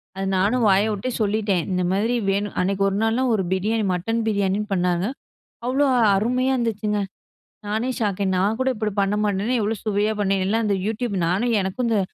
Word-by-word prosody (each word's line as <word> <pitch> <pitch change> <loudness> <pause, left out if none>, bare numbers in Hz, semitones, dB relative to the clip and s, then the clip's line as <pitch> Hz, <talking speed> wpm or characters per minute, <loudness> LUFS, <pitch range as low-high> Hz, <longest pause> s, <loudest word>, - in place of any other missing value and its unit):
அது 195 0 -3
நானும் 220 +6 +2
வாய 195 +1 +4
விட்டே 210 +4 -3
சொல்லிட்டேன். 205 -4 +1
இந்த 180 0 0
மாரி 215 +6 +1 0.2
வேணும் 200 +1 -2
அன்னைக்கு 195 +1 0
ஒரு 195 - -3
நாள்லாம் 235 +3 +1
ஒரு 205 -3 +1
பிரியாணி 210 +4 0
மட்டன் 225 +6 -1
பிரியாணின்னு 205 0 0
பண்ணாங்க. 180 -1 +1 0.6
அவ்ளோ 265 +3 +2 0.3
அருமையா 250 +6 +1
இருந்துச்சுங்க! 215 -3 -1 0.7
நானே 220 +4 -1
ஷாக். 205 -3 -1
நான் 200 +4 +1
கூட 260 0 +1
இப்டி 215 -1 -2
பண்ண 195 +1 +1
மாட்டேனே! 205 +3 0
எவ்ளோ 215 +2 0
சுவையா 210 0 +1
பண்ணி. 195 -1 +1
எல்லாம் 225 +4 +1
அந்த 205 -1 +1
யூடியூப். 220 0 -2
நானும் 220 +8 +1
எனக்கும் 190 +6 -2
இந்த, 220 -3 +2
210 Hz, 175 wpm, -22 LUFS, 195-225 Hz, 0.7 s, வாய